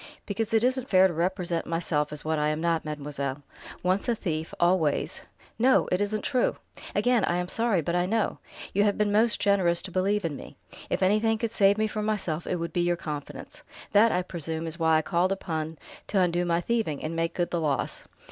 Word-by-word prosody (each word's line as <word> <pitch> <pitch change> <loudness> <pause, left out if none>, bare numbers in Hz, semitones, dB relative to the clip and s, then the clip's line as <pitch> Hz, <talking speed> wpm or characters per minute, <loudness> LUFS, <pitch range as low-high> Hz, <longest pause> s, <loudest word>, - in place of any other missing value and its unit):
"Because 220 +2 -2
it 225 0 +3
isn't 260 0 +1
fair 190 0 +6
to 180 - -4
represent 175 0 -1
myself 165 -3 -1
as 150 0 -7
what 160 -1 0
I 150 - +1
am 155 0 -1
not, 165 -1 0
mademoiselle. 145 -2 -4 0.4
Once 185 +5 +1
a 235 - +2
thief, 160 -6 -3
always 175 -4 +1 0.2
" - - -24
"No! 260 +3 +4
It 180 - +1
isn't 205 0 -1
true!" 255 -2 +1 0.4
"Again 245 -4 +3
I 175 - 0
am 180 0 -2
sorry, 220 -4 +1
but 170 +3 -1
I 180 0 +1
know. 220 +2 0 0.3
You 205 - +3
have 205 -1 +1
been 210 -1 +1
most 220 +2 +3
generous 185 -4 +3
to 190 - -7
believe 195 +2 +1
in 155 -3 -2
me. - - -11 0.3
If - - 0
anything 215 +3 +3
could 225 0 -2
save 200 -2 +4
me 215 - +2
from 215 0 -3
myself, 175 -7 -2
it - - 0
would 170 -1 -4
be 175 - +1
your 175 0 +2
confidence. 150 -3 -7 0.3
That, 220 +2 +5
I 180 - +1
presume, 165 -2 -4
is 165 +1 -4
why 160 0 +3
I - - +6
felt - - -20
called 180 +1 +1
upon 160 -4 -4 0.3
to 200 - +1
undo 175 -1 +2
my 170 0 +1
thieving, 220 -10 -1
and 160 +1 -3
make 165 0 -1
good 175 -1 -1
the 170 - 0
loss. 145 -3 -2
180 Hz, 225 wpm, -27 LUFS, 160-205 Hz, 0.4 s, fair